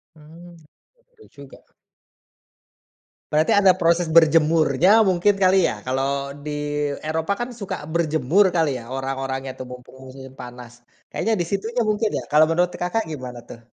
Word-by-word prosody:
Hmm, 165 +3 -15 0.6
betul 445 -3 -20
juga. 140 -1 -14 1.7
Berarti 155 +1 +3
ada 195 -2 +6
proses 170 0 +2
berjemurnya 160 -1 +4 0.2
mungkin 185 +3 +2
kali 185 +1 +4
ya? - - -2
Kalau 135 +1 0 0.3
di 150 - -5 0.6
Eropa 160 +4 -2
kan 240 - -3
suka 200 - -4 0.2
berjemur 165 +3 +2
kali 160 -2 +2
ya, 115 - -9
orang-orangnya 135 0 -4
tuh, - - -6
mumpung 125 +1 -12
musim 130 0 -11
panas. 125 -1 -11 0.4
Kayaknya 225 - -1
di - - -1
situnya 225 +5 -2
mungkin 215 +1 0
ya? - - -8
Kalau 150 +1 +6
menurut 175 +2 +1
Kakak 180 +6 -1
gimana 125 -4 -7
tuh? 115 - -10
160 Hz, 145 wpm, -22 LUFS, 135-180 Hz, 1.7 s, ada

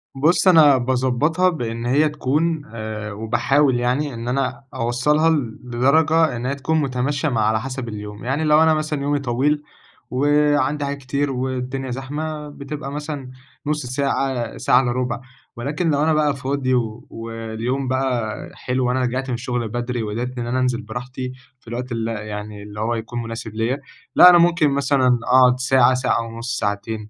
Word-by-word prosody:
بص، 160 +8 +3
أنا 155 -6 +7
باضبطها 130 +8 +1
بإن 115 -8 -4
هي 145 +5 +3
تكون 150 +3 0
آآ، 110 -1 -5
وباحاول 120 +5 +2
يعني 130 +4 0
إن 115 0 -6
أنا 135 +2 -1
أوصلها 130 +6 +2
لدرجة 140 +3 +2
إن 120 +1 -5
هي 135 +2 -1
تكون 155 +3 0
متماشية 140 +2 -1
مع، 115 -5 0
على 110 +1 +2
حسب 130 -1 -5
اليوم، 105 -1 -7
يعني 135 +5 0
لو 155 +1 +5
أنا 160 0 +4
مثلًا 155 -2 -2
يومي 145 +1 0
طويل، 140 +3 0 0.5
وعندي 145 +1 +2
حاجات 140 0 -3
كتير، 140 +1 -2
والدنيا 130 0 -3
زحمة، 150 +4 -4
بتبقى 145 0 -7
مثلًا 145 -3 -5 0.3
نص 150 -2 -1
ساعة، 130 -2 -1
ساعة 125 - +4
إلا 125 -2 -1
ربع، 125 0 -2 0.3
ولكن 145 +8 -2
لو 145 -1 +2
أنا 160 0 +3
بقى 150 -2 +2
فاضي 135 0 -2 0.4
واليوم 115 +3 -4
بقى 125 -4 -1 0.2
حلو، 125 0 -1
وأنا 125 +1 +1
رجعت 130 +2 -2
من - - -1
الشغل 120 -1 -2
بدري، 120 +1 -3
وقدرت 120 +4 -4
إن 120 -1 -3
أنا 125 +2 0
أنزل 125 -2 0
براحتي، 125 +3 -6 0.3
في - - -32
الوقت 125 +2 -5
اللي 115 -1 -2
يعني 105 -1 -6
اللي 105 0 -9
هو 115 +2 0
يكون 115 +1 -4
مناسب 115 -1 -6
ليَّ، 115 +4 0 0.4
لا، 180 - +10
أنا 175 - +8
ممكن 170 -3 +4
مثلًا 135 -3 +2
أقعد 125 0 +5
ساعة، 130 -1 +4
ساعة 125 -2 +1
ونص، 115 +3 -4
ساعتين، 105 +1 -3
130 Hz, 165 wpm, -21 LUFS, 120-145 Hz, 0.5 s, لا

